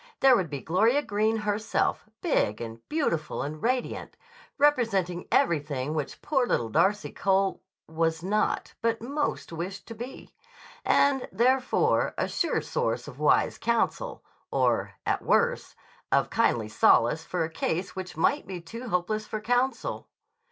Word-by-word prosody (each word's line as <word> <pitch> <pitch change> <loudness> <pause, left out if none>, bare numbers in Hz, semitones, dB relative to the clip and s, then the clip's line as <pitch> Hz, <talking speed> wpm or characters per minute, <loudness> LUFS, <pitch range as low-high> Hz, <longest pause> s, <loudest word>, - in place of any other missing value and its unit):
There 270 -2 +7
would 185 -8 0
be 140 -2 -5
Gloria 225 - +2
Greene 215 0 +1
herself, 210 0 0
big 105 - +1
and 115 -1 -6
beautiful 170 - -1
and 150 +2 -6
radiant, 250 +1 -2 0.4
representing 225 -12 +2
everything 145 -3 +1
which 150 -3 -4
poor 265 -5 +1
little 115 - 0
Darcy 200 - +2
Cole 195 0 +1 0.3
was 160 0 -1
not 210 +3 0
but 230 0 +1
most 280 - -3
wished 185 +4 -5
to - - -5
be, 240 +4 -9 0.5
and, 280 -2 +3
furthermore, 255 +3 +2
a - - 0
sure - - 0
source 485 0 -2
of - - -10
wise - - +3
counsel, 235 - -1 0.3
or, - - +1
at - - 0
worst, 485 +1 +1 0.4
of - - +2
kindly 120 - +2
solace 120 +7 +3
for 175 0 -2
a 160 - -3
case 165 +3 -2
which 185 -3 -6
might 285 - +1
be 185 -2 -5
too 230 +9 -8
hopeless 215 +4 -1
for 215 - -3
counsel. 245 +4 -1
205 Hz, 145 wpm, -27 LUFS, 165-245 Hz, 0.5 s, There